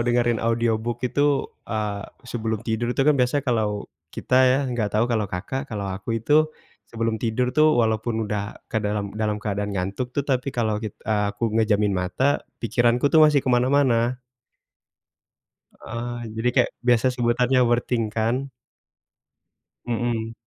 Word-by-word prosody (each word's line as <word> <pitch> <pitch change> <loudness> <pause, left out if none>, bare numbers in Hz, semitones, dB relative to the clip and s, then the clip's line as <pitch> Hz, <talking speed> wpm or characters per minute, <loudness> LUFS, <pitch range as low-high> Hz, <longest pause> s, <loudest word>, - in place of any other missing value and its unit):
dengerin 120 -1 +1
audiobook 115 +1 0
itu, 145 +2 +2 0.2
eee, 105 -2 -2 0.2
sebelum 110 -3 -3
tidur 115 +1 -1
itu - - +3
kan 150 - +5
biasa 135 +1 +1
kalau 110 -5 0 0.2
kita 130 +9 0
ya, 130 +1 +3
nggak 110 -4 -1
tahu 110 - +3
kalau, 110 -5 0
Kakak. 130 +10 -4
Kalau 105 -3 -4
aku 100 +4 -3
itu 155 +6 +3 0.4
sebelum 115 -1 -1
tidur 125 +2 0
tuh 155 +2 +4
walaupun 110 0 0
udah 105 0 -5
ke 110 - -1
dalam 105 -1 -2
dalam 105 0 -1
keadaan 105 -1 -3
ngantuk 100 +7 -3
tuh, 140 - +1
tapi 130 -1 0
kalau 110 -5 -1
kit 110 -2 -6
eee, 105 -2 +1
aku 115 0 -1
ngejamin 105 -2 +2
mata, 95 +11 0 0.2
pikiranku 120 +4 +2
tuh 160 - +7
masih 145 -2 +3
ke - - -1
mana-mana. 125 -1 +2 1.6
Heeh, 120 +1 -5 0.2
jadi 115 +2 0
kayak 125 -3 +3
biasa 120 0 +3
sebutannya 125 +2 +2
overthink 120 0 +1
kan. 125 +5 0 1.3
Mhm. 115 -1 -2
115 Hz, 145 wpm, -23 LUFS, 110-125 Hz, 1.6 s, tuh